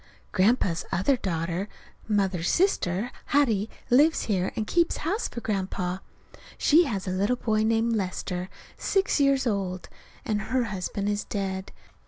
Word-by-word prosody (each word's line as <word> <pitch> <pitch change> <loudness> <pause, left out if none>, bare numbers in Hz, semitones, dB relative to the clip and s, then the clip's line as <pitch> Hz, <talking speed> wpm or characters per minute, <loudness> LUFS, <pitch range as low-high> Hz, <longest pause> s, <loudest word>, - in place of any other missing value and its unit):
Grandpa's 190 -4 +2
other 265 +10 +2
daughter, 175 -2 -2 0.4
Mother's 195 -5 +1
sister, 240 - +1
Hattie, 225 -7 +2 0.2
lives 295 +6 +5
here 190 -4 0
and 220 - -1
keeps 340 +7 +2
house 400 +8 0
for 235 - -7
Grandpa. 185 -3 -2 0.6
She 330 +4 +5
has 205 -8 -3
a - - -1
little 200 +6 +1
boy 220 -3 0
named 225 +1 +2
Lester, 185 -2 -3 0.3
six 390 -4 +1
years 275 -1 +3
old; 195 -5 -2 0.4
and 210 -1 0
her 255 +3 0
husband 200 -1 -3
is 205 0 0
dead. 190 -2 -4
210 Hz, 140 wpm, -26 LUFS, 185-245 Hz, 0.6 s, lives